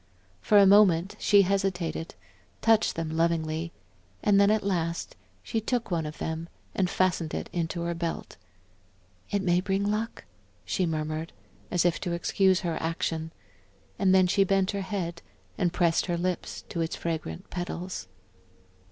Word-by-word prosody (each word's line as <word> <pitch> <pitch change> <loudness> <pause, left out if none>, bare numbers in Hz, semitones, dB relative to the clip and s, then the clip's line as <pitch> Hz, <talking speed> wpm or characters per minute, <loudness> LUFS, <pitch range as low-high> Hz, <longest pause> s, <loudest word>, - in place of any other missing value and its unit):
For 210 - +4
a 200 - +8
moment 195 -2 +5
she 205 -1 +5
hesitated, 185 -4 -1 0.4
touched 225 -1 +3
them 165 -1 -3
lovingly, 165 0 0 0.5
and 200 -1 +5
then 200 - +5
at 215 0 +2
last 170 -4 -2 0.3
she 225 - -2
took 235 -1 -2
one 165 -3 0
of 150 - -8
them 160 +1 -4 0.2
and 185 -2 +1
fastened 180 -4 0
it - - -5
in 170 -2 -1
her 170 0 -2
belt. 170 0 -4 0.9
"It 200 -1 0
may 175 -1 +3
bring 195 +1 0
luck," 210 +3 -2 0.4
she 185 - 0
murmured, 155 0 -3 0.4
as 180 -1 +1
if 175 -1 +2
to 175 -3 -3
excuse 185 +2 +2
her 170 -3 -2
action, 160 0 -2 0.7
and 195 -2 +4
then 185 -1 +6
she 195 +2 +3
bent 195 0 +2
her 200 -1 -3
head, 185 -4 -4 0.3
and 175 - +1
pressed 170 -1 +2
her 175 -1 0
lips 180 +1 -3
to 170 - -2
its 165 - -2
fragrant 160 - -4
petals. 180 - -5
175 Hz, 155 wpm, -28 LUFS, 165-195 Hz, 0.9 s, a